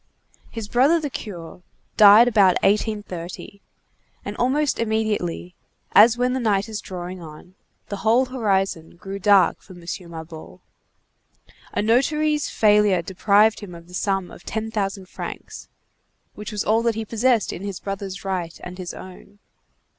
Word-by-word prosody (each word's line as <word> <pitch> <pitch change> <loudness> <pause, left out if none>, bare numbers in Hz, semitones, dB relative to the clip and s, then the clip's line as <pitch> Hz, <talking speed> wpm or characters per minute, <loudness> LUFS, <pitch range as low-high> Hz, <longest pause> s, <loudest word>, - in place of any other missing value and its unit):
His 225 -3 -6
brother 270 +10 +3
the 295 -3 -4
curé 180 -7 -8 0.3
died 210 +3 +8
about 200 -6 +4
1830, 200 -2 -2 0.6
and - - -5
almost 275 +4 0
immediately, 215 -6 -2 0.4
as 225 +3 +7
when 250 +1 +1
the 260 - -1
night 205 -4 +1
is 215 -1 -5
drawing 180 -1 -7
on, 160 +3 -12 0.4
the 200 - -4
whole 230 +5 +3
horizon 195 -10 -1
grew 195 +2 -7
dark 195 -3 +4
for 190 - -14
M. 175 - -13 0.3
Mabeuf. 160 -1 -10 1.1
A - - 0
notary's 300 +6 +1
failure 210 -4 +3
deprived 205 +4 +3
him 190 -5 -9
of 170 0 -13
the 180 - -16
sum 195 -1 -1
of - - -13
ten 220 0 -4
thousand 195 -3 -3
francs, - - -8 0.6
which 210 +2 -8
was 210 -1 -2
all 220 +2 +3
that 230 -1 0
he 225 0 -4
possessed 230 0 +1
in - - -7
his 200 -2 -5
brother's 195 -1 -6
right 180 -4 -3
and 180 +1 -8
his 180 -1 -6
own. 190 +2 -12
205 Hz, 150 wpm, -22 LUFS, 185-225 Hz, 1.1 s, died